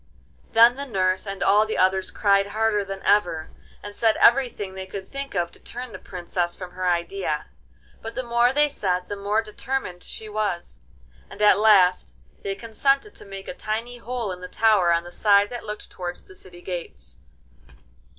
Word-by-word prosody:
Then 235 +3 +7
the 280 0 -5
nurse 185 -3 0
and 195 0 -3
all 210 +2 +4
the 220 - -2
others 190 0 +2
cried 200 -1 +2
harder 210 0 +1
than 195 0 -7
ever, 175 -6 +2 0.3
and 205 - -7
said 225 -2 +2
everything 235 -6 +3
they 190 0 -7
could 190 0 -7
think 275 -4 -6
of 175 -2 0
to - - -18
turn 245 0 -7
the - - -9
Princess 175 -1 -3
from 185 -2 -8
her 185 0 -3
idea. 175 - -1 0.6
But 225 0 -7
the 255 - -2
more 235 +1 +3
they 295 +2 +3
said 185 -10 -2
the 205 - -3
more 205 +2 0
determined 215 -4 -4
she 220 - -8
was, 210 - -3 0.5
and - - -12
at 210 -2 +5
last 195 -4 +4 0.3
they 195 0 -3
consented 275 - 0
to - - -12
make 195 -1 -9
a - - -4
tiny 230 +1 -4
hole 235 -3 -3
in 180 0 -7
the 180 - -6
tower 210 -4 +3
on 170 0 +2
the 175 - -10
side 205 +2 +3
that 240 -2 -6
looked 210 0 -7
towards 175 -1 -6
the 185 - -16
city 175 -1 -15
gates. 175 - -7
205 Hz, 190 wpm, -24 LUFS, 185-225 Hz, 0.6 s, Then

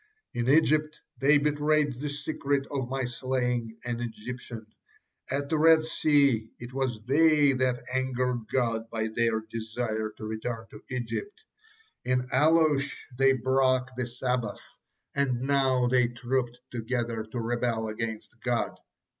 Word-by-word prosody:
In 120 +1 -1
Egypt 155 +1 +3 0.2
they 145 +2 +5
betrayed 150 -2 +1
the 145 +1 -3
secret 145 -1 -1
of 135 -4 -2
my 135 -1 -1
slaying 125 -2 -2
an 120 -1 -2
Egyptian: 120 0 -6 0.6
at 140 +1 -1
the 155 +1 0
Red 160 0 +6
Sea 140 -8 +3
it 120 +1 -9
was 125 -5 -2
they 150 +1 +5
that 130 -1 0
angered 125 -3 -1
God 115 -3 0
by 110 -1 -2
their 115 0 +1
desire 110 0 -3
to 110 - -7
return 110 +1 -4
to - - -11
Egypt; 135 - -4 0.6
in 125 0 0
Alush 150 0 +3 0.2
they 135 +1 +5
broke 130 0 +2
the 125 -1 -2
Sabbath, 125 -3 -2 0.5
and 130 -3 +1
now 135 -2 +2
they 125 -1 +4
trooped 120 0 -2
together 115 -1 -2
to 110 +3 -5
rebel 115 -1 -1
against 110 0 -4
God. - - -1
125 Hz, 135 wpm, -28 LUFS, 115-140 Hz, 0.6 s, Red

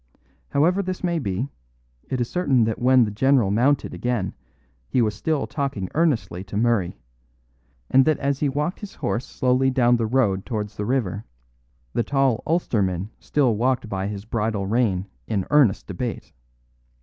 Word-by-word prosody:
However 170 +7 +2
this 185 -1 -4
may 170 -2 +1
be, 110 0 -2 0.6
it 130 - -1
is 120 - 0
certain 140 -9 +2
that 110 0 -1
when 130 0 +5
the 105 - -1
general 120 -1 +3
mounted 130 +7 +2
again 120 -6 -2 0.6
he - - +1
was 110 -3 +2
still 150 +8 -1
talking 135 - -3
earnestly 145 - 0
to 100 +2 -5
Murray; 110 - +1 0.9
and 135 - +5
that 155 -2 +3
as 140 -1 -1
he 145 - +1
walked 150 +6 -2
his 205 -3 -9
horse 120 - -2
slowly 130 +1 +2
down 125 -2 +3
the 115 -1 0
road 110 -6 +1
towards 105 -3 -4
the 105 - -3
river, 115 -6 -1 0.7
the - - +1
tall 135 0 +1
Ulsterman 105 - 0
still 130 -6 +1
walked 125 0 0
by 95 -1 -2
his 100 0 -6
bridle 110 -3 -1
rein 100 -3 +1 0.2
in 100 -4 -1
earnest 140 -10 +4
debate. 115 +5 -5
120 Hz, 160 wpm, -23 LUFS, 105-135 Hz, 0.9 s, when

